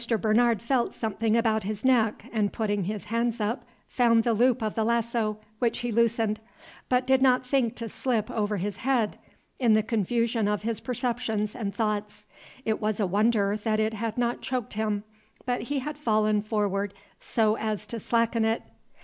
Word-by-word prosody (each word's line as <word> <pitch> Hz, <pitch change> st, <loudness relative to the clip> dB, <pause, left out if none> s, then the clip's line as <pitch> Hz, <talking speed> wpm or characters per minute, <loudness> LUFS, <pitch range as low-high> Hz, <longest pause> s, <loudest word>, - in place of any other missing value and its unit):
Bernard 225 Hz, 0 st, +3 dB
felt 245 Hz, 0 st, 0 dB
something 220 Hz, 0 st, 0 dB
about 220 Hz, -2 st, +2 dB
his 210 Hz, +3 st, -4 dB
neck, 230 Hz, -5 st, +3 dB
and, 210 Hz, -3 st, +1 dB
putting 205 Hz, -4 st, -1 dB
his 205 Hz, -1 st, -4 dB
hands 230 Hz, +1 st, -1 dB
up, 215 Hz, +4 st, -1 dB, 0.2 s
found 230 Hz, -2 st, +3 dB
the 235 Hz, -, +2 dB
loop 245 Hz, +2 st, +3 dB
of 215 Hz, -, -1 dB
the 225 Hz, -, 0 dB
lasso, 230 Hz, -1 st, 0 dB, 0.2 s
which 235 Hz, -2 st, +1 dB
he 240 Hz, -1 st, -2 dB
loosened, 225 Hz, -1 st, +2 dB, 0.5 s
but 250 Hz, 0 st, +2 dB
did 265 Hz, 0 st, +3 dB
not 255 Hz, -1 st, +4 dB
think 250 Hz, -3 st, +1 dB
to 230 Hz, -2 st, -4 dB
slip 225 Hz, -1 st, -1 dB
over 210 Hz, -1 st, -1 dB
his 195 Hz, +1 st, -3 dB
head, 245 Hz, -4 st, 0 dB, 0.4 s
in 235 Hz, -4 st, +4 dB
the 215 Hz, -, +3 dB
confusion 225 Hz, +1 st, 0 dB
of 210 Hz, 0 st, -1 dB
his 225 Hz, -1 st, -1 dB
perceptions 235 Hz, -4 st, -2 dB
and 210 Hz, -5 st, -4 dB
thoughts. 210 Hz, -1 st, -2 dB, 0.4 s
It 220 Hz, 0 st, 0 dB
was 215 Hz, 0 st, -1 dB
a 205 Hz, -, +2 dB
wonder 205 Hz, +1 st, +2 dB
that 215 Hz, 0 st, 0 dB
it 220 Hz, 0 st, +1 dB
had 225 Hz, +1 st, -3 dB
not 240 Hz, 0 st, 0 dB
choked 255 Hz, -4 st, -3 dB
him, 210 Hz, -1 st, -1 dB, 0.4 s
but 245 Hz, -1 st, 0 dB
he 280 Hz, +5 st, -2 dB
had 295 Hz, +2 st, -4 dB
fallen 215 Hz, -5 st, +2 dB
forward 205 Hz, -2 st, -1 dB, 0.2 s
so 220 Hz, -2 st, +1 dB
as 215 Hz, -2 st, -2 dB
to 230 Hz, -, -5 dB
slacken 230 Hz, +1 st, +1 dB
it. 225 Hz, +1 st, +1 dB
225 Hz, 180 wpm, -27 LUFS, 210-235 Hz, 0.5 s, not